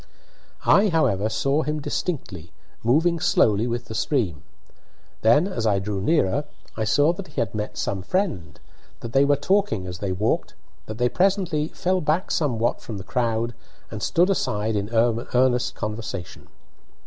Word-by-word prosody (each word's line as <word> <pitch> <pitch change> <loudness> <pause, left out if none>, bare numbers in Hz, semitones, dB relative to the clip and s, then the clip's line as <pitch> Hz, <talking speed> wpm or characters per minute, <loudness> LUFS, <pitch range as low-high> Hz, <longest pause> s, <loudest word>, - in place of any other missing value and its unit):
I, 200 +1 +5
however, 110 - +1
saw 135 +7 +1
him 150 0 -2
distinctly, 120 - -4 0.3
moving 165 +8 +3
slowly 115 - +3
with 120 0 -3
the - - -8
stream. 110 - -1 0.8
Then, 130 - +4
as 115 - -2
I 100 -2 +3
drew 100 0 -3
nearer, 145 - +1 0.3
I 110 - -1
saw 145 +9 +3
that 185 +1 -8
he - - -6
had 115 - -1
met 105 -1 -4
some 95 -1 -2
friend, 100 - -2 0.4
that 115 -1 -7
they 135 - +5
were 145 0 +4
talking 190 - 0
as 90 0 -6
they 100 -2 -2
walked, 100 +5 -1 0.3
that 110 - -6
they 125 0 +2
presently 180 -2 +1
fell 185 +2 -1
back 155 +5 0
somewhat 120 -7 0
from 110 - -7
the 95 - -7
crowd 115 +2 -1 0.4
and - - -6
stood 180 +3 +2
aside 110 - -1
in 100 0 -2
earnest 120 +2 +1
conversation. 105 -4 -6
120 Hz, 160 wpm, -24 LUFS, 105-155 Hz, 0.8 s, I